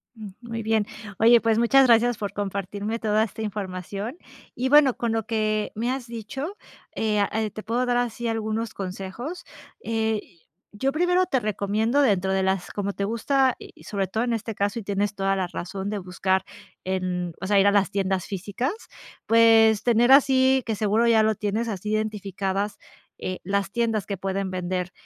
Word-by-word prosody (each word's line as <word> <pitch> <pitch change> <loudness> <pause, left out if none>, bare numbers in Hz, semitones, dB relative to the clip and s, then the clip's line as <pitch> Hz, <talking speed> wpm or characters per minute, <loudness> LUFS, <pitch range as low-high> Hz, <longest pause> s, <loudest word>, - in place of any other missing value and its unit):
Mm. 215 -2 -8
Muy 230 -1 -5
bien. 220 -1 +1 0.3
Oye, 235 +1 +6
pues 225 0 +2
muchas 265 +3 +5
gracias 235 0 +4
por 205 -2 -4
compartirme 205 +2 -3
toda 215 0 +2
esta 220 0 -6
información. 200 - -5 0.4
Y 255 +2 -1
bueno, 285 -3 +6
con 235 -1 -1
lo 225 -1 -1
que 215 -2 -1
me 235 +4 -1
has 260 -2 -4
dicho, 265 - -6 0.4
eh, 215 -1 0
ah, 200 - +2
eh, 220 -1 -1
te 215 +1 -8
puedo 240 +3 0
dar 245 -1 +1
así 240 -1 -2
algunos 225 0 -2
consejos. 195 - -6 0.4
Eh, 220 -1 -1 0.5
yo 265 +6 0
primero 355 +4 +2
te 270 -8 +1
recomiendo, 215 +4 0
dentro 195 -7 +2
de 190 0 +1
las 190 -1 0
como 200 -1 -3
te 200 - -3
gusta, 255 +4 +1
y - - -14
sobre 195 -2 -2
todo 220 +5 -1
en 240 - 0
este 225 0 -3
caso, 200 +1 -1
y - - -8
tienes 200 +1 -1
toda 195 0 0
la 190 -2 -1
razón 190 +3 -5
de 210 - -2
buscar 190 0 -1 0.4
en 180 -2 -2
o 190 - -3
sea, 200 0 +4
ir 195 - +5
a - - +5
las 200 -1 +3
tiendas 190 -2 -1
físicas, 205 - -3 0.5
pues 225 -1 +5
tener 240 +1 +4
así, 265 -1 +5
que 225 - -1
seguro 215 +2 +2
ya 225 -2 +5
lo 220 0 +2
tienes 210 +3 -2
así 210 0 -4
identificadas, 200 -2 -2 0.4
eh, 185 0 -4
las 195 +1 -1
tiendas 225 -4 0
que 200 - -4
pueden 195 +1 -2
vender 180 0 -3
215 Hz, 185 wpm, -25 LUFS, 195-230 Hz, 0.5 s, Oye